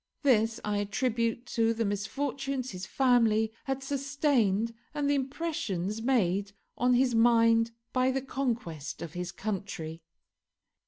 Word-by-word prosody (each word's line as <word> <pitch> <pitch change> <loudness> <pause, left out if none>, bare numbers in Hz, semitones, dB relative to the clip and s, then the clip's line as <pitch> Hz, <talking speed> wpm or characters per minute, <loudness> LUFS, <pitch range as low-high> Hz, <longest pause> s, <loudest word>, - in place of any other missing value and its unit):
This 225 -5 +3
I 210 -1 0
attribute 230 +3 -1
to 230 0 +2
the 225 0 0
misfortunes 265 +5 -2
his 185 +1 -6
family 230 -4 +3
had 270 0 -2
sustained 270 -6 +1 0.2
and 290 -1 0
the 285 - +3
impressions 255 - -2
made 200 -5 +1 0.2
on 250 +1 +3
his 250 0 +3
mind 230 0 +5 0.2
by 255 0 +3
the 265 0 -1
conquest 235 - -3
of 165 -2 -7
his 180 0 -4
country. 180 -5 -5
230 Hz, 125 wpm, -29 LUFS, 205-265 Hz, 0.2 s, mind